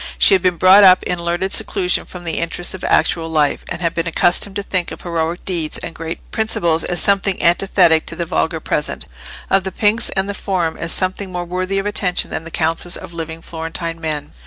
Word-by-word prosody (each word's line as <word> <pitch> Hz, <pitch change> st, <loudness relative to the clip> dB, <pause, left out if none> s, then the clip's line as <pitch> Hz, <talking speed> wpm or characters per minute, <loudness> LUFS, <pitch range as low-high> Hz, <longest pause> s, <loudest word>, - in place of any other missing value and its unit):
She -, -, +7 dB
had 190 Hz, -, +4 dB
been 180 Hz, -1 st, +1 dB
brought 190 Hz, +4 st, +7 dB
up 185 Hz, -1 st, +7 dB
in 180 Hz, -1 st, -2 dB
learned 175 Hz, +3 st, -1 dB
seclusion 180 Hz, -3 st, -1 dB
from 180 Hz, -1 st, -10 dB
the 165 Hz, -2 st, -2 dB
interests 170 Hz, +1 st, -3 dB
of 190 Hz, -, -9 dB
actual 165 Hz, -1 st, +2 dB
life, 150 Hz, -3 st, +1 dB
and 175 Hz, -, -5 dB
had 170 Hz, -, 0 dB
been 165 Hz, +1 st, -2 dB
accustomed 175 Hz, +4 st, +2 dB
to 200 Hz, -, -2 dB
think 185 Hz, -3 st, -2 dB
of -, -, -9 dB
heroic 170 Hz, 0 st, -3 dB
deeds 170 Hz, -5 st, -2 dB
and -, -, -7 dB
great 165 Hz, 0 st, -5 dB
principles 170 Hz, -7 st, 0 dB
as 175 Hz, -, -1 dB
something 200 Hz, -1 st, +2 dB
antithetic 170 Hz, -2 st, +3 dB
to 170 Hz, -, -5 dB
the 170 Hz, -, -3 dB
vulgar 160 Hz, -1 st, -1 dB
present, 150 Hz, -1 st, -3 dB, 0.5 s
of 195 Hz, -1 st, +3 dB
the 190 Hz, -, -4 dB
Pnyx 220 Hz, +3 st, +1 dB
and 190 Hz, 0 st, 0 dB
the 200 Hz, -, -3 dB
Forum 180 Hz, -4 st, -2 dB
as 165 Hz, -, -4 dB
something 190 Hz, +1 st, -2 dB
more 175 Hz, -1 st, -4 dB
worthy 185 Hz, +2 st, -2 dB
of 195 Hz, -, -1 dB
attention 190 Hz, -3 st, 0 dB
than 160 Hz, -, -4 dB
the -, -, -7 dB
councils 165 Hz, +2 st, +1 dB
of 170 Hz, -, -10 dB
living 165 Hz, 0 st, -6 dB
Florentine 165 Hz, 0 st, -5 dB
men. 155 Hz, -2 st, -4 dB
175 Hz, 215 wpm, -18 LUFS, 165-190 Hz, 0.5 s, She